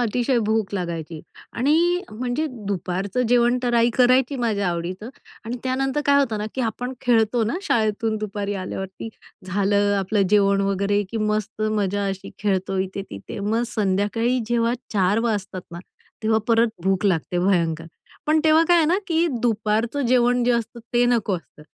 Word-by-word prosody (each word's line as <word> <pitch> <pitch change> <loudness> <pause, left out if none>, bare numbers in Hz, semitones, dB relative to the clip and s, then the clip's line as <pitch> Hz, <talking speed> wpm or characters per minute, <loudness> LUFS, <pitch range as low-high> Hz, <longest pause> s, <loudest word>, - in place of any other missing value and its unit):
अतिशय 245 +2 +1
भूक 220 -2 0
लागायची 170 -4 -4 0.3
आणि 335 +8 +2
म्हणजे 245 +7 -2 0.2
दुपारचं 195 +3 -2
जेवण 245 0 +3
तर 240 -1 0
आई 235 0 +4
करायची 255 +2 +4
माझ्या 215 -6 0
आवडीचं 175 +5 -4 0.4
आणि 235 +3 -4
त्यानंतर 270 +2 0
काय 280 0 +5
होतं 230 -6 0
ना 210 - -3
की 265 - -2
आपण 245 +2 -3
खेळतो 230 -1 +2
ना 220 - -1
शाळेतून 220 - 0
दुपारी 205 -1 -3
आल्यावरती. 190 +2 -5 0.4
झालं 205 +2 +1
आपलं 195 +2 +1
जेवण 200 -1 +4
वगैरे, 200 +1 +1
की - - -4
मस्त 215 0 -2
मजा 205 -2 0
अशी 195 -1 -5
खेळतो 195 -1 -1
इथे 190 +1 -3
तिथे. 100 - -8
मग 220 +4 0
संध्याकाळी 215 +3 0
जेव्हा 235 0 +1 0.2
4:00 195 +1 +2
वाजतात 205 -5 -2
ना, 170 - -7 0.4
तेव्हा 220 0 +3
परत 230 0 +4 0.2
भूक 190 0 +1
लागते 175 -1 0
भयंकर. 170 -3 +1 0.4
पण 310 +1 +3
तेव्हा 315 +1 +5
काय 350 - +6
आहे 325 -2 +4
ना 335 - +3
की 335 0 +2 0.2
दुपारचं 225 +3 0
जेवण 245 0 +3
जे 245 - +3
असतं 235 0 -3
ते 240 0 +4
नको 225 -5 +1
असतं. 165 -2 -15
215 Hz, 165 wpm, -23 LUFS, 195-245 Hz, 0.4 s, काय